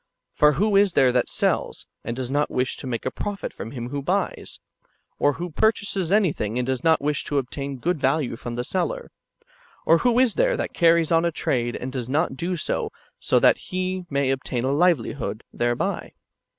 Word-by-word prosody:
For 150 Hz, 0 st, +5 dB
wdio 200 Hz, +5 st, +3 dB
is 200 Hz, -3 st, +3 dB
there 130 Hz, -2 st, +4 dB
that 125 Hz, -1 st, +1 dB
sells, -, -, -1 dB, 0.2 s
and 120 Hz, -, -4 dB
does 130 Hz, 0 st, -4 dB
not 145 Hz, +1 st, +1 dB
wish 125 Hz, 0 st, -1 dB
to -, -, -7 dB
make 120 Hz, -3 st, -3 dB
a 130 Hz, -, -1 dB
profit 205 Hz, -4 st, -5 dB
from -, -, -7 dB
him 120 Hz, -1 st, -6 dB
who 140 Hz, +1 st, -3 dB
buys? 185 Hz, +6 st, -2 dB, 0.6 s
Or 145 Hz, -, +3 dB
who 175 Hz, +2 st, -5 dB
purchases 200 Hz, -2 st, +1 dB
any 200 Hz, -6 st, +4 dB
thing, 105 Hz, +3 st, -3 dB
and 125 Hz, -, 0 dB
does 130 Hz, -1 st, -2 dB
not 160 Hz, -3 st, +3 dB
wish 150 Hz, 0 st, 0 dB
to 145 Hz, -, -1 dB
obtain 140 Hz, +1 st, -3 dB
good 170 Hz, +5 st, -1 dB
value 135 Hz, -2 st, +1 dB
from 120 Hz, 0 st, -6 dB
the 120 Hz, -, -2 dB
seller? 480 Hz, -, -2 dB, 0.7 s
Or 165 Hz, +1 st, +5 dB
who 245 Hz, -1 st, +2 dB
is 255 Hz, -4 st, +4 dB
there -, -, +2 dB
that -, -, -3 dB
carries 170 Hz, -1 st, +3 dB
on 165 Hz, 0 st, +4 dB
a 170 Hz, -, +1 dB
trade, 120 Hz, -6 st, -1 dB
and 130 Hz, -, -5 dB
does 125 Hz, -2 st, -4 dB
not 145 Hz, 0 st, 0 dB
do 175 Hz, +6 st, -2 dB
so -, -, -2 dB, 0.4 s
that -, -, +5 dB
he 185 Hz, 0 st, -3 dB
may 140 Hz, -1 st, +1 dB
obtain 130 Hz, -2 st, -2 dB
a 130 Hz, -, +1 dB
livelihood 140 Hz, -7 st, +1 dB
thereby 120 Hz, 0 st, -1 dB
145 Hz, 200 wpm, -24 LUFS, 130-180 Hz, 0.7 s, For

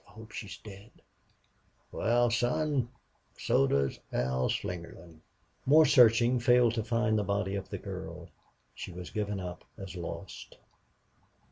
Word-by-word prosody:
"God! -, -, -24 dB
I -, -, -18 dB
hope 110 Hz, 0 st, -12 dB
she's 100 Hz, -2 st, -7 dB
dead." 100 Hz, +1 st, -12 dB, 1.0 s
"Wal, 120 Hz, +1 st, +2 dB
son, 130 Hz, +2 st, +1 dB, 0.5 s
so 70 Hz, -, +2 dB
does 70 Hz, -1 st, 0 dB
Al 65 Hz, 0 st, 0 dB
Slingerland." 85 Hz, -3 st, -5 dB, 0.5 s
More 155 Hz, +3 st, +7 dB
searching 120 Hz, -2 st, +5 dB
failed 120 Hz, -1 st, +4 dB
to 115 Hz, -2 st, -1 dB
find 115 Hz, -1 st, +1 dB
the -, -, 0 dB
body 100 Hz, 0 st, -1 dB
of 100 Hz, -1 st, -4 dB
the -, -, -4 dB
girl. -, -, -7 dB, 0.4 s
She -, -, -7 dB
was 90 Hz, -3 st, -8 dB
given 105 Hz, +1 st, -2 dB
up 90 Hz, -1 st, -7 dB
as 95 Hz, -2 st, -8 dB
lost. 85 Hz, -2 st, -7 dB
105 Hz, 140 wpm, -30 LUFS, 90-120 Hz, 1.0 s, More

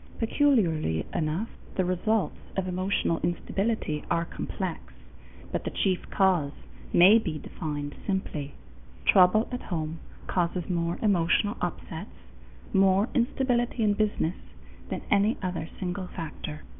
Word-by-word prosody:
Peculiarly 190 Hz, -, +2 dB
enough, 160 Hz, +8 st, -1 dB, 0.3 s
the 185 Hz, -, +1 dB
results 185 Hz, +4 st, +1 dB, 0.2 s
of 190 Hz, -1 st, 0 dB
emotional 185 Hz, -2 st, 0 dB
instability 175 Hz, -1 st, -1 dB
are 170 Hz, 0 st, +1 dB
complex, -, -, -4 dB, 0.7 s
but -, -, -2 dB
the -, -, -2 dB
chief 185 Hz, -2 st, -1 dB
cause 180 Hz, -7 st, +2 dB, 0.4 s
may 195 Hz, +6 st, +8 dB
be 165 Hz, -8 st, -3 dB
defined 145 Hz, -2 st, -5 dB
simply: 155 Hz, -7 st, -2 dB, 0.5 s
trouble 190 Hz, +4 st, +6 dB
at 250 Hz, -, -3 dB
home 160 Hz, -2 st, -3 dB, 0.3 s
causes 175 Hz, -1 st, -1 dB
more 170 Hz, -1 st, 0 dB
emotional 205 Hz, +1 st, +3 dB
upsets, -, -, -4 dB, 0.6 s
more 195 Hz, +3 st, +4 dB
instability 245 Hz, -2 st, +1 dB
in 210 Hz, -1 st, +4 dB
business, 205 Hz, -5 st, 0 dB, 0.5 s
than -, -, -3 dB
any 205 Hz, +3 st, +4 dB
other 180 Hz, -3 st, -3 dB
single 185 Hz, 0 st, -3 dB
factor. 155 Hz, -3 st, -6 dB
185 Hz, 120 wpm, -28 LUFS, 165-210 Hz, 0.7 s, may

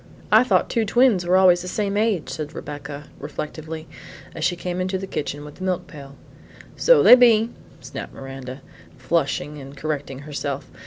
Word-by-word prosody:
"I 220 Hz, +3 st, +7 dB
thought 255 Hz, -, +2 dB
two 230 Hz, -, 0 dB
twins 220 Hz, -5 st, +3 dB
were 185 Hz, +1 st, +4 dB
always 180 Hz, -2 st, +5 dB
the 180 Hz, -, -7 dB
same 200 Hz, +1 st, -2 dB
age," 210 Hz, -5 st, +1 dB
said 155 Hz, 0 st, -6 dB
Rebecca, 145 Hz, 0 st, -8 dB
reflectively, 155 Hz, +1 st, -6 dB, 0.5 s
as 160 Hz, -, -6 dB
she 175 Hz, -, +2 dB
came 180 Hz, +1 st, -4 dB
into 185 Hz, +1 st, -1 dB
the 195 Hz, -, -5 dB
kitchen 145 Hz, -4 st, -4 dB
with 150 Hz, -, -12 dB
the 185 Hz, -, -8 dB
milk 185 Hz, -1 st, -1 dB
pail. 140 Hz, -3 st, -12 dB, 0.6 s
"So -, -, +5 dB
they -, -, +10 dB
be," 235 Hz, -2 st, +6 dB, 0.3 s
snapped -, -, -7 dB
Miranda, 135 Hz, 0 st, -8 dB, 0.3 s
flushing 150 Hz, -2 st, -1 dB
and 135 Hz, +1 st, -11 dB
correcting 145 Hz, -3 st, -4 dB
herself. 140 Hz, -2 st, -4 dB
165 Hz, 170 wpm, -23 LUFS, 145-195 Hz, 0.6 s, they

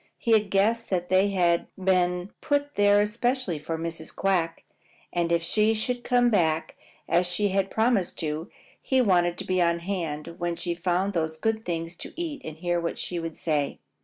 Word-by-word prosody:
He 235 Hz, -, -1 dB
had 215 Hz, -2 st, +4 dB
guessed 220 Hz, +4 st, +2 dB
that 180 Hz, -2 st, -1 dB
they 185 Hz, +2 st, +4 dB
had 175 Hz, -3 st, +2 dB
been 180 Hz, -1 st, +1 dB
put 285 Hz, 0 st, 0 dB
there 205 Hz, 0 st, +5 dB
especially 230 Hz, -, -1 dB
for 160 Hz, +2 st, -4 dB
Mrs. 165 Hz, -1 st, -5 dB
Quack, 175 Hz, -4 st, 0 dB, 0.5 s
and 170 Hz, -1 st, 0 dB
if 170 Hz, -1 st, +2 dB
she 215 Hz, +6 st, +2 dB
should 245 Hz, +3 st, -2 dB
come 245 Hz, -1 st, +3 dB
back 160 Hz, -5 st, +1 dB, 0.3 s
as 175 Hz, +1 st, +2 dB
she 200 Hz, +4 st, 0 dB
had 195 Hz, 0 st, 0 dB
promised 220 Hz, -5 st, +1 dB
to -, -, -3 dB, 0.2 s
do, -, -, -25 dB, 0.3 s
he 265 Hz, -, +1 dB
wanted 175 Hz, -6 st, +3 dB
to -, -, -5 dB
be 185 Hz, -1 st, +1 dB
on 170 Hz, 0 st, +3 dB
hand 170 Hz, -2 st, -4 dB
when 175 Hz, -1 st, -1 dB
she 175 Hz, 0 st, -2 dB
found 180 Hz, +3 st, 0 dB
those 160 Hz, -2 st, -1 dB
good 220 Hz, +5 st, -1 dB
things 165 Hz, -1 st, -3 dB
to -, -, -9 dB
eat 325 Hz, -4 st, -4 dB
and 155 Hz, 0 st, -7 dB
hear 175 Hz, +1 st, 0 dB
what 170 Hz, -, -3 dB
she 175 Hz, -, -2 dB
would 165 Hz, -1 st, -5 dB
say. 150 Hz, -3 st, -1 dB
180 Hz, 190 wpm, -26 LUFS, 170-210 Hz, 0.5 s, there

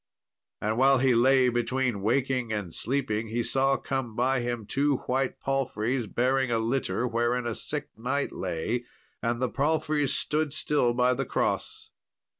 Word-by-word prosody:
And 110 Hz, +2 st, -1 dB
while 135 Hz, +1 st, +6 dB
he 130 Hz, 0 st, +3 dB
lay 130 Hz, +2 st, +5 dB
between 120 Hz, -2 st, 0 dB
waking 125 Hz, +2 st, 0 dB
and 100 Hz, -6 st, -3 dB
sleeping, 115 Hz, -3 st, -1 dB
he 115 Hz, +2 st, -1 dB
saw 135 Hz, +2 st, +2 dB
come 130 Hz, -5 st, -3 dB
by 130 Hz, +2 st, +2 dB
him 120 Hz, -2 st, -3 dB
two 140 Hz, +4 st, +1 dB
white 130 Hz, 0 st, -1 dB
palfreys 130 Hz, -3 st, -1 dB
bearing 130 Hz, +3 st, +1 dB
a 115 Hz, -, +1 dB
litter, 120 Hz, +2 st, 0 dB
wherein 120 Hz, +1 st, 0 dB
a 120 Hz, -, -1 dB
sick 145 Hz, +6 st, -4 dB
knight 130 Hz, +5 st, -1 dB
lay, 95 Hz, +7 st, -3 dB, 0.4 s
and 120 Hz, 0 st, -1 dB
the 130 Hz, -, +1 dB
palfreys 150 Hz, +1 st, 0 dB
stood 155 Hz, -1 st, -1 dB
still 135 Hz, -6 st, +1 dB
by 125 Hz, +1 st, +3 dB
the 135 Hz, +2 st, -2 dB
cross. -, -, -2 dB
125 Hz, 155 wpm, -27 LUFS, 115-135 Hz, 0.4 s, while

